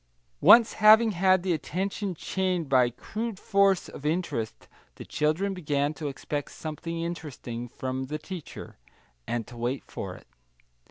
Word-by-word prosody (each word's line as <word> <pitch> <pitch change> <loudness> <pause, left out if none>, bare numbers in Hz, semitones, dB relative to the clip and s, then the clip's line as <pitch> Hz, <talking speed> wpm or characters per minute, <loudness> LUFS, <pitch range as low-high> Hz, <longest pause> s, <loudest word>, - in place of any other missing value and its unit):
Once 230 -1 +7
having 220 +1 +7
had 185 -1 +3
the 185 -2 +1
attention 190 +4 -3
chained 185 -1 -1
by 130 -2 +4
crude 220 - -5
force 195 -1 +2
of - - -10
interest, 150 -8 -2 0.3
the - - -9
children 160 +7 0
begin 145 -4 -1
to 155 -1 -5
expect 145 +1 -4
something 165 +2 -6
interesting 135 -8 -5
from 130 +2 -4
the 150 +3 -4
teacher, 165 - -9 0.5
and 120 -2 -2
to 120 - -12
wait 120 +3 -2
for 90 -2 -6
it. - - -15
160 Hz, 145 wpm, -27 LUFS, 135-190 Hz, 0.5 s, Once